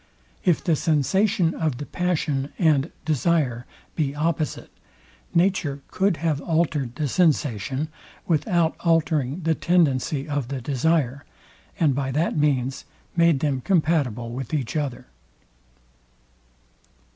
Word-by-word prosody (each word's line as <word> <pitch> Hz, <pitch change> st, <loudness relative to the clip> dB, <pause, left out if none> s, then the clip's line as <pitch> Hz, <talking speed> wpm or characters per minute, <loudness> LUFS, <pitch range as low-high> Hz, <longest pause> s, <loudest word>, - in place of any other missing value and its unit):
If 175 Hz, -4 st, +2 dB
the 165 Hz, -, +2 dB
sensation 170 Hz, -, +2 dB
of 155 Hz, -6 st, -1 dB
the 145 Hz, -, -5 dB
passion 150 Hz, -6 st, -1 dB
and 155 Hz, -4 st, +2 dB
desire 150 Hz, -5 st, +1 dB, 0.3 s
be 145 Hz, -3 st, -1 dB
opposite, 155 Hz, 0 st, -2 dB, 0.6 s
nature 170 Hz, -6 st, +1 dB
could 190 Hz, -2 st, +1 dB
have 150 Hz, -3 st, +1 dB
altered 155 Hz, -7 st, 0 dB
the 150 Hz, +1 st, -1 dB
sensation 140 Hz, -, +1 dB, 0.4 s
without 165 Hz, 0 st, +1 dB
altering 160 Hz, -3 st, +1 dB
the 165 Hz, 0 st, +2 dB
tendency 150 Hz, -4 st, +1 dB
of 145 Hz, -4 st, -2 dB
the 135 Hz, 0 st, -4 dB
desire, 140 Hz, +1 st, 0 dB, 0.6 s
and 150 Hz, -5 st, +3 dB
by 135 Hz, 0 st, -2 dB
that 155 Hz, +5 st, 0 dB
means 135 Hz, -4 st, 0 dB, 0.3 s
made 170 Hz, -5 st, +4 dB
them 140 Hz, -4 st, 0 dB
compatible 145 Hz, -, +1 dB
with 130 Hz, +3 st, -4 dB
each 135 Hz, -3 st, -3 dB
other. 135 Hz, -5 st, -2 dB
150 Hz, 115 wpm, -24 LUFS, 135-165 Hz, 0.6 s, made